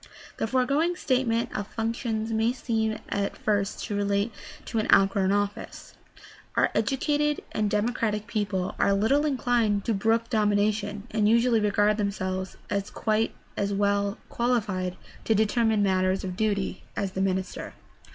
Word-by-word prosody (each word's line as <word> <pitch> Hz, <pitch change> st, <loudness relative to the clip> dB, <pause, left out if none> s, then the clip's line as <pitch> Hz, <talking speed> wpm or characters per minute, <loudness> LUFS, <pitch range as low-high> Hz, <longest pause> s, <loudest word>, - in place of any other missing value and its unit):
— -, -, -18 dB
The -, -, 0 dB
foregoing 275 Hz, +8 st, +1 dB
statement 250 Hz, -7 st, 0 dB
of 205 Hz, -1 st, -3 dB
functions 225 Hz, 0 st, -2 dB
may 225 Hz, +2 st, +2 dB
seem 220 Hz, -3 st, -1 dB
at 200 Hz, 0 st, -2 dB
first 205 Hz, -1 st, -1 dB
to 210 Hz, -, -3 dB
relate 200 Hz, +2 st, 0 dB, 0.3 s
to 225 Hz, -, -2 dB
an 215 Hz, -, -1 dB
out 195 Hz, 0 st, +6 dB
grown 195 Hz, -1 st, +1 dB
office. 205 Hz, 0 st, -3 dB, 0.6 s
Our -, -, +3 dB
educated 295 Hz, +2 st, 0 dB
and 210 Hz, -1 st, 0 dB
democratic 210 Hz, 0 st, 0 dB
people 205 Hz, -5 st, -2 dB
are 200 Hz, -, +3 dB
little 270 Hz, +10 st, +2 dB
inclined 240 Hz, -7 st, +1 dB
to 230 Hz, -, +1 dB
brook 225 Hz, +3 st, +1 dB
domination, 210 Hz, -1 st, +1 dB
and 210 Hz, -1 st, +2 dB
usually 235 Hz, 0 st, +4 dB
regard 210 Hz, 0 st, +2 dB
them 205 Hz, -2 st, +1 dB
selves 185 Hz, -1 st, -4 dB
as 200 Hz, 0 st, -2 dB
quite 220 Hz, 0 st, 0 dB, 0.2 s
as 200 Hz, 0 st, -1 dB
well 200 Hz, 0 st, +1 dB
qualified 205 Hz, -7 st, -1 dB, 0.3 s
to 225 Hz, -, +3 dB
determine 220 Hz, 0 st, +2 dB
matters 185 Hz, -1 st, +1 dB
of 185 Hz, -1 st, -4 dB
duty 205 Hz, -1 st, -1 dB
as 200 Hz, -2 st, -2 dB
the 190 Hz, -, -3 dB
minister. 190 Hz, -1 st, -2 dB
210 Hz, 150 wpm, -27 LUFS, 200-230 Hz, 0.6 s, out